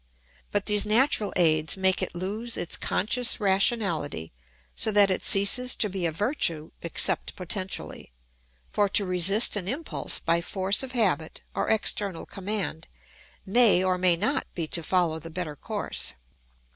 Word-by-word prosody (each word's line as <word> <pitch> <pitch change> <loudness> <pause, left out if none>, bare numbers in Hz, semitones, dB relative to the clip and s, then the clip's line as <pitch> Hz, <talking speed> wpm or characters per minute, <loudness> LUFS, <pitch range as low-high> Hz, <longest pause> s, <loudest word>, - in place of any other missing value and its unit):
But 205 -1 -1
these 210 -1 +2
natural 220 -1 +2
aids 155 -1 +2
make 190 0 +2
it - - -4
lose 210 +6 -3
its 175 - -1
conscious 235 +4 -1
rationality, 190 - 0 0.4
so - - +2
that 200 -2 +5
it 185 - -1
ceases 235 +6 +4
to 210 - +1
be 185 -2 -2
a - - -2
virtue 165 - -1
except 170 - 0
potentially; 185 - -4 0.6
for 205 -1 +1
to 200 +1 +3
resist 185 +6 +3
an 190 -3 -3
impulse 285 +9 -1
by 170 +1 0
force 190 +4 0
of 265 -1 -5
habit 195 -9 -1
or - - -2
external 205 -4 -1
command 195 -4 -4 0.6
may 205 -3 +4
or 185 -1 0
may 180 -1 +4
not 245 - -1
be 170 - -3
to 170 - +2
follow 165 -1 0
the 165 - -10
better 165 -3 -5
course. 100 - -3
190 Hz, 150 wpm, -26 LUFS, 170-210 Hz, 0.6 s, that